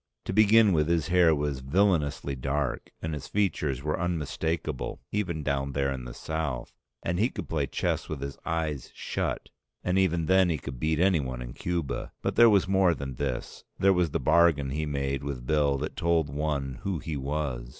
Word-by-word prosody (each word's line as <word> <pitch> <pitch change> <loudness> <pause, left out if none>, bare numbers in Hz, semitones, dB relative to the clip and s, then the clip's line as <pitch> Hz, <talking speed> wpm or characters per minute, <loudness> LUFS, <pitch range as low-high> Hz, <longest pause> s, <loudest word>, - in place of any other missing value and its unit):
To - - -3
begin 110 0 +6
with 75 -2 +2
his 85 -3 +1
hair 85 -3 +5
was 75 -2 -2
villainously 75 -2 +1
dark, 70 +1 -2
and 80 -1 -2
his 75 - -5
features 75 -10 0
were 75 0 -1
unmistakable 80 -3 -2
even 85 -7 -2
down 70 -1 -1
there 70 0 0
in 65 -2 -6
the - - -7
South, 80 -6 -3 0.3
and 85 +1 -1
he 115 +4 +3
could 100 -8 -6
play 75 -4 -1
chess - - -2
with 80 - -4
his 70 +1 -5
eyes 80 -4 -2
shut, - - -3 0.3
and 90 +1 +2
even 85 -3 +2
then 95 +1 +4
he 80 - +1
could 65 -2 -7
beat 80 +2 0
anyone 75 -9 +2
in - - -6
Cuba. 85 -5 -3
But - - -1
there 120 0 +8
was 100 -3 +4
more 95 -3 +3
than 65 -4 -6
this, - - -4
there 95 0 +4
was 90 -3 +2
the - - -1
bargain 80 -6 +3
he 75 +2 -2
made 70 -1 -2
with 65 -4 -5
Bill 70 0 +2
that 75 +3 -4
told 85 -5 +1
one 70 -3 -2
who 95 -3 -2
he 80 0 -5
was. 70 -3 -3
75 Hz, 190 wpm, -28 LUFS, 70-85 Hz, 0.3 s, there